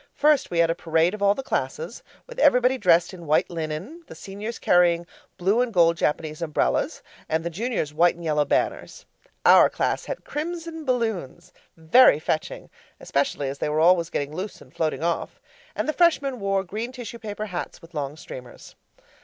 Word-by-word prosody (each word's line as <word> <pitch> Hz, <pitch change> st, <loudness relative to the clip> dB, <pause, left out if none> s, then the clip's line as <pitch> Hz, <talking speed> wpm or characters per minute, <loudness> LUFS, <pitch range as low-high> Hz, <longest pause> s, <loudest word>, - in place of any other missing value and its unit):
First 300 Hz, -2 st, +3 dB
we 170 Hz, -, -3 dB
had 165 Hz, 0 st, +4 dB
a -, -, +1 dB
parade 165 Hz, +1 st, +1 dB
of 215 Hz, -, -7 dB
all 200 Hz, 0 st, +4 dB
the 270 Hz, -, -5 dB
classes, 475 Hz, -, -3 dB, 0.2 s
with -, -, -10 dB
everybody 250 Hz, -, +4 dB
dressed 175 Hz, -2 st, +3 dB
in 175 Hz, -3 st, -10 dB
white 155 Hz, +3 st, +2 dB
linen, 170 Hz, -, -5 dB
the -, -, -11 dB
Seniors 205 Hz, +4 st, -7 dB
carrying 175 Hz, -1 st, +3 dB, 0.3 s
blue 200 Hz, +7 st, +2 dB
and 250 Hz, -1 st, -1 dB
gold 170 Hz, -4 st, +4 dB
Japanese 155 Hz, 0 st, -2 dB
umbrellas, 150 Hz, -, -1 dB, 0.3 s
and 160 Hz, +1 st, 0 dB
the 170 Hz, -, -3 dB
juniors 205 Hz, -, -2 dB
white 170 Hz, +3 st, +3 dB
and 170 Hz, -, -11 dB
yellow 150 Hz, -2 st, +1 dB
banners. -, -, -2 dB, 0.4 s
Our -, -, +7 dB
class -, -, -1 dB
had -, -, -6 dB
crimson 330 Hz, +1 st, -5 dB
balloons 225 Hz, -, -2 dB, 0.2 s
very 160 Hz, -, +6 dB
fetching, 155 Hz, 0 st, -3 dB, 0.3 s
especially 140 Hz, 0 st, -1 dB
as 135 Hz, +1 st, -5 dB
they -, -, -1 dB
were 150 Hz, +1 st, 0 dB
always 170 Hz, 0 st, +4 dB
getting 145 Hz, +1 st, -3 dB
loose 190 Hz, +3 st, -5 dB
and 130 Hz, -, -17 dB
floating 160 Hz, -1 st, -2 dB
off 170 Hz, 0 st, -2 dB, 0.4 s
and -, -, -2 dB
the 310 Hz, -, 0 dB
Freshmen 290 Hz, -7 st, +2 dB
wore 195 Hz, -1 st, 0 dB
green 215 Hz, +6 st, -5 dB
tissue 240 Hz, -2 st, -8 dB
paper 215 Hz, -1 st, -5 dB
hats 180 Hz, -4 st, -6 dB
with 165 Hz, -, -17 dB
long 145 Hz, 0 st, -4 dB
streamers. 125 Hz, -5 st, -11 dB
175 Hz, 180 wpm, -24 LUFS, 160-235 Hz, 0.4 s, Our